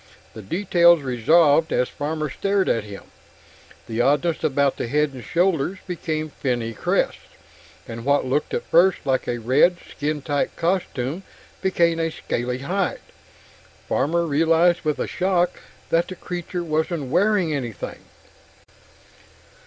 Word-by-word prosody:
The 110 - -9
details 170 - +3
resolved 145 +6 +3
as 125 - +1
Farmer 155 +1 -3
stared 195 +2 0
at 115 - 0
him. 100 -1 -9 0.8
The 115 +1 -2
oddness 145 +5 +1
about 140 -1 +1
head 150 +4 0
and 125 -2 -9
shoulders 180 0 0
became 160 -3 -3
finny 120 -5 -2
crests; - - 0 0.7
what 125 +5 0
had 130 - -5
looked 145 +3 0
at - - -3
first 175 0 +3
like 130 -2 0
a 120 - -1
red 130 +10 +3
skin 150 -1 -3
tight 145 -1 -1
costume 165 -4 -1 0.4
became 170 -3 +2
a 165 0 0
scaly 125 -5 -3
hide. 180 +8 -2 0.9
Farmer 170 +4 +1
realized 165 +3 +3
with 155 -2 -1
a - - -1
shock 180 -1 0 0.3
that 170 +1 +2
the 185 - -7
creature 175 0 -5
wasn't 155 -3 -2
wearing 185 -2 +2
anything. 120 -9 -5
155 Hz, 130 wpm, -23 LUFS, 135-175 Hz, 0.9 s, details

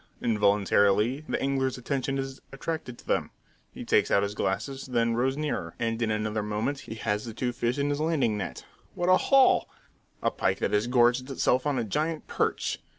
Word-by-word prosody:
Involuntarily 105 +3 +2
the - - 0
angler's 135 -1 0
attention 135 +1 -2
is 135 0 -5
attracted 135 -3 -5
to - - -16
them. - - 0 0.4
He - - -8
takes - - +3
out 100 - +3
his 100 0 -2
glasses, 135 +8 -2
then 115 -2 +1
rows 130 +4 0
nearer; 145 - -3
and 115 0 -2
in 115 - +1
another 110 0 -1
moment 105 +7 -2
he 110 - -8
has 105 -1 -1
the 115 -2 -7
two 125 +1 -1
fish 120 +2 -1
in 145 0 0
his 145 +1 -1
landing 155 -9 +1
net. 105 - -5 0.3
What 175 +1 0
a 185 - +7
haul! 270 -2 +4 0.5
A - - +2
pike - - 0
that - - -1
has 105 +3 +2
gorged 125 +1 +3
itself 130 0 +1
on 145 -2 0
a 120 - 0
giant 155 +9 -2
perch! - - -1
125 Hz, 195 wpm, -27 LUFS, 110-140 Hz, 0.5 s, a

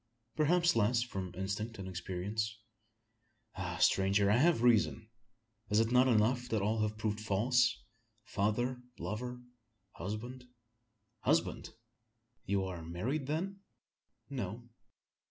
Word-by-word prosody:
"Perhaps 170 +2 +3
less 115 +2 +3
from 95 -7 -5
instinct 105 +4 -3
than 95 -1 -6
experience. 95 +4 -3 1.0
Ah! - - -4
stranger! 100 +1 +4
I 110 - +5
have 155 -3 +4
reason. 115 -2 +3 0.6
Is 105 +1 +3
it 115 +1 +2
not 125 +1 +5
enough 125 +2 +2
that 110 -3 0
all 110 +2 +1
have 105 0 -1
proved 110 -1 -1
false 120 +5 +2 0.4
father, 120 +5 -1 0.2
lover, 125 +3 -5 0.5
husband?" 120 +8 -6 0.7
"Husband! - - +1 0.8
You 100 0 +1
are 90 -3 -5
married, 110 - -3
then?" 185 +6 -2 0.7
"No." 120 -2 -5
110 Hz, 115 wpm, -33 LUFS, 100-125 Hz, 1.0 s, I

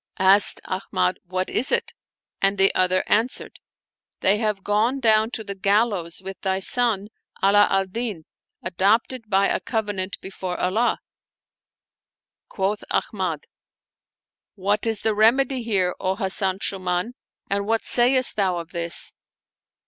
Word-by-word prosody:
Asked 195 +1 +6
Ahmad, 95 - -2
" - - -54
What 185 +1 -3
is 255 - 0
it? - - -1 0.2
" - - -63
and 195 +1 +1
the 195 0 +3
other 185 0 +1
answered, 225 +4 -1 0.6
"They 200 +2 +3
have 210 -3 -2
gone 220 +6 0
down 220 -2 +3
to 220 - -7
the 200 - -6
gal 200 +4 +2
lows 175 -3 -6
with 195 0 -8
thy 190 -1 -1
son 210 0 -1 0.3
Ala 205 +1 +5
al 195 0 +1
Din, 200 -4 -5 0.4
adopted 215 +6 0
by 195 -1 +2
a - - -1
covenant 205 -4 -4
before 190 -2 -6
Allah!" 215 +7 0 1.5
Quoth 200 +2 -2
Ahmad, 180 -7 -3 1.1
"What 205 +2 -1
is 225 -2 +1
the 220 - +1
rem 220 +5 +4
edy 270 -1 -1
here, 195 -6 0
O 185 +1 -1
Hasan 190 -2 +5
Shuuman, 185 +2 -2 0.4
and 200 0 -2
what 225 0 0
sayest 255 +1 +2
thou 190 -4 0
of 165 -1 -8
this?" 170 -1 -1
200 Hz, 145 wpm, -22 LUFS, 185-220 Hz, 1.5 s, Asked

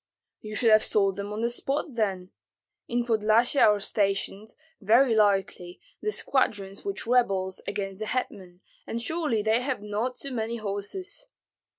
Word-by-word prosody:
"You 215 0 -8
should 230 0 +3
have 215 0 +6
sold 195 -2 +2
them 200 +1 -5
on 210 +1 -4
the 235 - +1
spot, 275 +4 -1
then. 195 -5 -2 0.6
In 240 0 -1
Podlyasye 225 +3 +3
are 210 -1 +5
stationed, 200 +1 -1 0.3
very 230 +5 +4
likely, 195 -4 +1 0.2
the 425 - -1
squadrons 200 - -1
which 395 -1 -4
rebelled 195 -6 +1
against 195 -1 -4
the 215 - -4
hetman, 190 -8 -4 0.3
and 230 - -3
surely 295 -5 -1
they 220 +3 +2
have 255 -5 -3
not 215 +5 -2
too 275 - -6
many 230 -1 -2
horses." 230 - -5
215 Hz, 155 wpm, -27 LUFS, 200-245 Hz, 0.6 s, have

